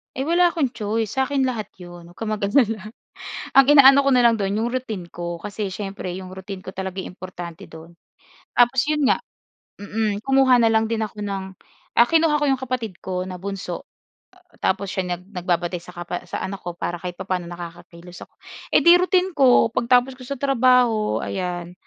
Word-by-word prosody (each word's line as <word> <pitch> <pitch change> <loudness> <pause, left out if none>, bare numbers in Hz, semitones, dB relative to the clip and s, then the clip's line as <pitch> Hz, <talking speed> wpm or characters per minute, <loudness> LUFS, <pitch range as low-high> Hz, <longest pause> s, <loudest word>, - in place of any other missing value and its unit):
Eh, 265 - -2
wala 345 +4 +4
akong 320 -7 0
choice. 220 -1 -2
Sa 265 - +2
akin 280 -2 0
lahat 230 -6 -2
'yon, 175 -1 -12
huwag 175 - -17
kang 220 -1 -4
mag-alala. 215 0 +1 0.7
Ang 270 - +8
inaano 280 -1 +7
ko - - +5
na 250 - +5
lang 230 -1 +4
do'n, 195 -1 -1
yung 225 +3 -1
routine 220 -9 -5
ko. 170 -1 -6
Kasi 210 0 -4
siyempre 195 -3 -5
yung 185 0 -8
routine 190 0 -8
ko - - -7
yung 190 - -21
talaga 190 0 -4
importante 180 -2 -9
do'n. 160 +1 -13 0.6
Tapos 245 +2 +4
'yon 300 0 0
nga, 270 - +3 0.6
mm, 210 0 -3
kumuha 270 -2 +5
na 235 - +3
lang 220 0 +2
din 225 -1 -1
ako 210 0 -10
ng 195 -2 -3 0.5
ah, 235 - +5
kinuha 320 -2 +3
ko - - +2
yung 270 - +2
kapatid 245 -7 -4
ko 185 -1 -2
na 185 0 -6
bunso, 190 -2 -6 0.7
tapos 195 0 -1
siya 180 -2 -2
nag 175 - -16
nagbabantay 175 -1 -1
sa 180 +2 -14
kapa 175 +1 -6
sa - - -4
anak 195 0 -5
ko 175 -1 -7
para 175 0 -4
kahit 180 0 -6
papa'no 185 -2 -3
nakakakilos 175 0 -10
ako. - - -41 0.4
Eh - - +5
di 340 - +8
routine 370 0 +2
ko 260 -6 +4
pagtapos 250 +3 +2
ko 255 - -11
sa 280 - -3
trabaho, 250 -5 +2
ayan. 175 -2 -4
210 Hz, 190 wpm, -22 LUFS, 180-255 Hz, 0.7 s, Ang